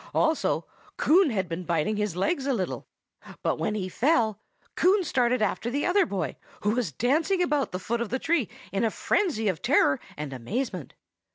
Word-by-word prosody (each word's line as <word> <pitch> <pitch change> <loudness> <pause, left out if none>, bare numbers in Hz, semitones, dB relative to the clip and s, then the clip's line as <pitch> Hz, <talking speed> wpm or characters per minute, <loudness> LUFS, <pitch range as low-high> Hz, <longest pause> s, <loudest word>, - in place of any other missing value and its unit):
Also, 320 -1 +1 0.3
Coon 350 +1 +5
had 190 -6 -1
been 170 +2 -4
biting 170 +4 0
his 210 -4 -1
legs 270 - 0
a 270 - +2
little. 190 -5 -3 0.6
But - - 0
when 210 - -1
he 190 -3 -2
fell, 225 - +2 0.4
Coon 385 +2 +4
started 250 -6 +1
after 220 +3 -1
the 285 +4 -1
other 365 0 +3
boy, 195 - -3 0.2
who 210 - +2
was 235 -7 -1
dancing 305 - +1
about 295 -5 0
the 180 - -2
foot 235 +5 -2
of 235 - -2
the 260 - 0
tree 305 - 0 0.2
in 195 +3 0
a 225 - +3
frenzy 230 - 0
of 185 -5 -1
terror 145 - +3 0.2
and 145 -2 -5
amazement. 180 - -4
230 Hz, 185 wpm, -27 LUFS, 190-295 Hz, 0.6 s, Coon